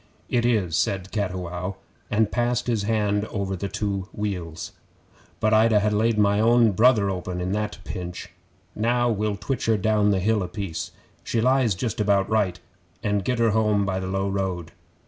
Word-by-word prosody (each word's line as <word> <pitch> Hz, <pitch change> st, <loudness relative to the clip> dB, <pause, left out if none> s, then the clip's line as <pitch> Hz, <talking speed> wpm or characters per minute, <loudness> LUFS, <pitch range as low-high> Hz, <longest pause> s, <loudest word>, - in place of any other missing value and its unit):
'It 120 Hz, -2 st, +1 dB
is,' 100 Hz, -9 st, +1 dB
said 95 Hz, +2 st, -1 dB
Cattiwow, 90 Hz, -2 st, -3 dB, 0.3 s
and 105 Hz, 0 st, +1 dB
passed 120 Hz, 0 st, 0 dB
his 115 Hz, -4 st, 0 dB
hand 105 Hz, -1 st, 0 dB
over 100 Hz, -2 st, -3 dB
the 100 Hz, +2 st, -3 dB
two 100 Hz, -2 st, -3 dB
wheals. 90 Hz, -6 st, -4 dB, 0.7 s
'But 110 Hz, 0 st, +2 dB
I'd 110 Hz, +1 st, +5 dB
ha' 105 Hz, 0 st, +3 dB
laid 110 Hz, +1 st, +2 dB
my 100 Hz, 0 st, +3 dB
own 115 Hz, 0 st, +5 dB
brother 110 Hz, -1 st, +4 dB
open 90 Hz, -1 st, -4 dB
at 90 Hz, +2 st, -2 dB
that 105 Hz, 0 st, -2 dB
pinch. 90 Hz, -1 st, -6 dB, 0.4 s
Now 120 Hz, +2 st, +1 dB
we'll 105 Hz, -1 st, -1 dB
twitch 130 Hz, +5 st, -3 dB
her 110 Hz, -1 st, +3 dB
down 105 Hz, +1 st, +2 dB
the 100 Hz, -, +2 dB
hill 105 Hz, +2 st, +1 dB
a 90 Hz, -, -2 dB
piece 100 Hz, -6 st, -5 dB, 0.3 s
she 115 Hz, -, -1 dB
lies 125 Hz, -3 st, +3 dB
just 110 Hz, +2 st, -2 dB
about 100 Hz, -2 st, +2 dB
right 100 Hz, -5 st, +1 dB, 0.4 s
and 105 Hz, -2 st, 0 dB
get 125 Hz, +5 st, 0 dB
her 115 Hz, -1 st, +3 dB
home 105 Hz, -2 st, +2 dB
by 95 Hz, -1 st, -1 dB
the 95 Hz, -, -4 dB
low 95 Hz, +1 st, -1 dB
road. 95 Hz, -4 st, -2 dB
105 Hz, 180 wpm, -24 LUFS, 95-110 Hz, 0.7 s, I'd